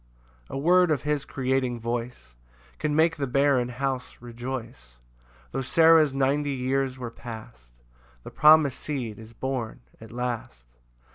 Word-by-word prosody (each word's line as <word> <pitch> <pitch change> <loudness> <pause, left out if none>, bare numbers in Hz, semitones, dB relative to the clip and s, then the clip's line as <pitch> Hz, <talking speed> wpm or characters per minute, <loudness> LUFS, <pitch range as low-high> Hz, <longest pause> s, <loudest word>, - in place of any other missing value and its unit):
6 - - -29
[A - - -5
word 180 +5 +4
of 150 -5 0
his 150 -1 -1
creating 130 -2 -1
voice 115 - -5 0.5
Can 150 -1 -1
make 165 +1 +3
the 140 -2 -2
barren 135 -1 +2
house 130 0 -3
rejoice: 120 - -7 0.5
Tho' - - -2
Sarah's 160 +2 +5
ninety 140 +2 +1
years 130 0 -1
were 120 -2 -6
past, 110 - -10 0.5
The - - -9
promis'd 150 -3 +6
seed 125 -8 -4
is 110 +1 -12
born 130 -2 -4 0.2
at 110 - -12
last. 120 - -4
130 Hz, 140 wpm, -26 LUFS, 120-145 Hz, 0.5 s, promis'd